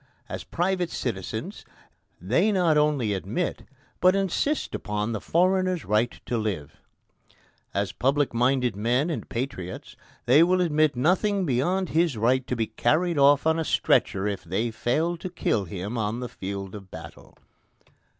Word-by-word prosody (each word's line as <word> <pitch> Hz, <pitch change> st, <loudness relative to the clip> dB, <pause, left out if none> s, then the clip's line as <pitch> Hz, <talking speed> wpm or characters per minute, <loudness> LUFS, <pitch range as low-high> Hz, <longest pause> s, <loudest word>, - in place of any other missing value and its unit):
As -, -, -6 dB
private 180 Hz, 0 st, -1 dB
citizens 110 Hz, -, -4 dB, 0.6 s
they 130 Hz, -, +2 dB
not 180 Hz, -5 st, +3 dB
only 150 Hz, -8 st, +2 dB
admit 100 Hz, -, -3 dB, 0.3 s
but 185 Hz, +1 st, +5 dB
insist 195 Hz, -, 0 dB
upon 105 Hz, +2 st, -2 dB
the 110 Hz, -, -3 dB
foreigner's 185 Hz, 0 st, +1 dB
right 110 Hz, +3 st, 0 dB
to 120 Hz, -, -1 dB
live. 95 Hz, -10 st, -4 dB, 0.9 s
As 100 Hz, 0 st, -1 dB
public 140 Hz, +1 st, +1 dB
minded 125 Hz, -1 st, +1 dB
men 125 Hz, -, +1 dB
and 155 Hz, -, -5 dB
patriots, 105 Hz, -8 st, -5 dB, 0.3 s
they 135 Hz, +6 st, +6 dB
will 180 Hz, +2 st, +4 dB
admit 155 Hz, -4 st, +2 dB
nothing 190 Hz, -, +1 dB
beyond 175 Hz, +7 st, 0 dB
his 160 Hz, -5 st, +1 dB
right 125 Hz, +4 st, +1 dB
to 125 Hz, -, -1 dB
be 115 Hz, -2 st, 0 dB
carried 155 Hz, +9 st, +1 dB
off 140 Hz, +1 st, +5 dB
on 160 Hz, 0 st, +2 dB
a -, -, 0 dB
stretcher 100 Hz, -9 st, +1 dB
if 100 Hz, -3 st, -2 dB
they 100 Hz, +7 st, -2 dB
fail 160 Hz, +10 st, 0 dB
to 185 Hz, -, -6 dB
kill 110 Hz, -, -1 dB
him 100 Hz, +7 st, -5 dB
on 110 Hz, +2 st, -2 dB
the 125 Hz, -1 st, -5 dB
field 95 Hz, -1 st, -6 dB
of 100 Hz, -3 st, -10 dB
battle. -, -, -12 dB
130 Hz, 150 wpm, -25 LUFS, 105-170 Hz, 0.9 s, they